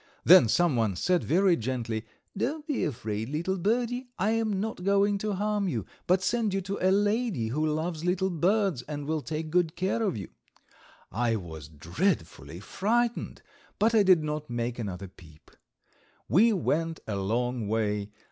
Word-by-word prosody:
Then 175 -8 +8
someone 115 - +2
said 180 - +1
very 185 +2 +3
gently: 115 -3 -3 0.3
"Don't 295 +9 -2
be 295 -5 -1
afraid, 110 -5 -3
little 170 +6 -2
birdie; 245 +5 -1
I 200 +4 +1
am 220 -3 0
not 210 -3 -4
going 200 +1 +2
to 210 0 -2
harm 205 0 0
you, 115 - -2 0.2
but 185 +1 +3
send 225 -3 0
you 195 - 0
to 195 +2 -4
a 185 - +4
lady 205 - +1
who 150 +6 -1
loves 160 +1 -2
little 185 +2 0
birds, 185 - +1
and 145 -1 -5
will 155 +1 -1
take 155 +4 -5
good 175 -1 +1
care 190 +5 -1
of 200 - 0
you." 100 - -7 0.8
I 115 +3 0
was 80 -7 -7
dreadfully 80 - -2
frightened, 230 - -1 0.3
but 220 +3 +2
I 220 - +6
did 185 -5 +5
not 150 -1 -4
make 120 0 -3
another 100 -3 -5
peep. 80 -4 -18 0.8
We 225 +7 +5
went 165 -4 -1
a 105 - -3
long 115 +3 -1
way. 105 -1 -1
165 Hz, 165 wpm, -28 LUFS, -, 0.8 s, Then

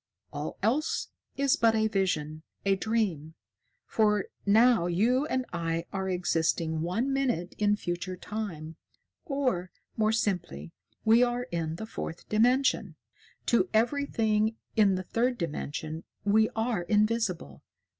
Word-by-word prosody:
All 145 +1 -5
else 270 +9 0 0.3
is 275 -1 +3
but 225 -1 +3
a 220 0 +2
vision, 155 -7 -1 0.2
a 195 0 +4
dream. 190 -8 -1 0.5
For 210 -2 +1 0.2
now 220 -3 +5
you 235 - +2
and 260 -4 -1
I 165 -1 -2
are 190 -1 -2
existing 165 -2 0
one 225 +11 -1
minute 245 -10 -1
in 205 0 +3
future 180 -1 -4
time, 170 -6 -6 0.5
or, 260 - -1 0.3
more 215 -1 +3
simply, 180 - -2 0.3
we 225 +2 +6
are 245 0 +1
in 165 -2 -2
the 220 - -6
Fourth 170 -6 -7
Dimension. 250 +5 +2 0.5
To 240 +10 +2
everything 225 -3 +1 0.2
in 205 -3 +4
the 185 - -3
third 245 +5 0
dimension, 155 0 -4 0.2
we 220 +2 +4
are 225 -3 0
invisible. 210 - 0
210 Hz, 125 wpm, -29 LUFS, 170-230 Hz, 0.5 s, we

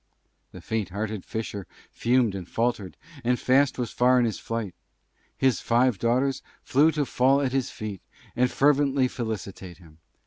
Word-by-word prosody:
The - - -11
Faint 110 -3 -2
hearted 105 +1 -4
Fisher 105 -4 -5 0.2
Fumed 120 -3 +2
and 95 -3 -6
Faltered, 115 -7 -2 0.3
and 125 +1 +1
Fast 130 +1 +3
was 120 -3 -3
Far 125 +1 +3
in 125 - +3
his 110 - -2
Flight. 115 -5 -4 0.6
His 130 -2 +2
Five 120 -3 +2
daughters 130 +3 +1 0.2
Flew 145 +4 +4
to 150 -2 0
Fall 130 +2 +3
at 135 -2 0
his 135 -1 0
Feet, 105 -3 -7 0.3
and 125 +1 +2
Fervently 140 -1 +3
Felicitate 100 - -6
him. 80 -3 -19
120 Hz, 160 wpm, -26 LUFS, 105-130 Hz, 0.6 s, Flew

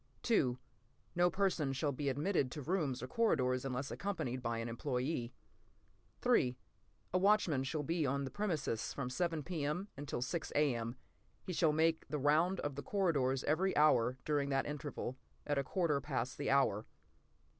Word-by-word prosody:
li> 130 - +3 0.6
No 175 +1 +4
person 175 -7 +1
shall 140 +2 0
be 140 +1 -1
admitted 145 +1 +1
to 150 +1 -6
rooms 150 -7 -1
or - - -4
corridors 130 - +2
unless 135 +1 -3
accompanied 130 -11 -3
by 115 -1 -1
an 115 +1 -3
employee. 125 +1 -2 0.9
A 125 +7 -1
watchman 185 -8 +3
shall 150 +3 -2
be 165 +2 0
on 140 0 0
the 135 - -5
premises 155 - -2
from 125 -3 -3
7 165 +3 -1
P.M. 170 +3 -2
until 140 -3 -3
6 165 +6 -3
A.M. 120 -5 +1 0.5
He 185 - -4
shall 160 -2 +3
make 160 +1 +2
the 150 - -2
round 155 +6 +3
of 145 - -2
the 140 - -5
corridors 140 -7 +1
every 185 +6 +1
hour 130 -5 +4
during 145 -2 +1
that 135 -1 +1
interval, 145 -3 -5 0.3
at 145 -1 +1
a - - 0
quarter 150 -1 0
past 130 -3 -3
the - - -1
hour. 120 -6 +2
145 Hz, 160 wpm, -35 LUFS, 130-165 Hz, 0.9 s, No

